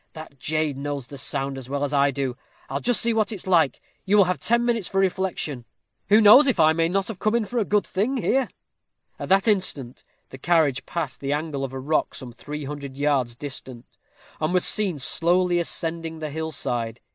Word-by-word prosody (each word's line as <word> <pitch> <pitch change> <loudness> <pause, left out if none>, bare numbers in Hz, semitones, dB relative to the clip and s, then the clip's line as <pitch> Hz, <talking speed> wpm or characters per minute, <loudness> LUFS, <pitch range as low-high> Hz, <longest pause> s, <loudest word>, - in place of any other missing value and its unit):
that 155 -4 -11
jade 155 -2 -1
knows 140 -2 -4
the 140 - -11
sound 135 +1 -2
as 130 -1 -11
well 140 +1 -2
as 145 0 -2
I 140 0 +4
do. 135 -2 -3 0.4
I'll 140 - -1
just 245 +8 +1
see 235 0 +2
what 220 -1 +1
it's 205 -5 -7
like! 170 -7 +2 0.2
you 205 +2 +2
will 200 - +8
have 180 0 -1
ten 235 +1 +2
minutes 230 -5 0
for 195 - -4
reflection. 185 -8 -1 0.5
Who 210 +2 +7
knows 235 +7 +8
if 250 -9 +1
I 155 0 +6
may 165 0 +1
not 195 +1 0
have 220 -5 -7
come 215 +2 +1
in 235 -2 +1
for 240 +3 -2
a 215 - 0
good 205 0 +1
thing 225 +8 -1
here?" 260 +1 +1 0.7
At - - -6
that 195 +3 +3
instant 155 - 0 0.3
the 130 - -11
carriage 155 -4 +1
passed 160 -7 -4
the 140 +1 -2
angle 150 -2 -3
of 135 - -4
a 135 - -6
rock 150 +4 -1
some 130 -3 -8
three 150 +4 -7
hundred 140 -1 -7
yards 140 -5 0
distant, 130 -3 -8 0.5
and 155 +3 0
was 180 - +3
seen 200 -7 +1
slowly 175 +6 +1
ascending 165 -1 -3
the 155 -2 -5
hill 160 +1 -4
side. 120 -5 -3
160 Hz, 215 wpm, -24 LUFS, 140-195 Hz, 0.7 s, will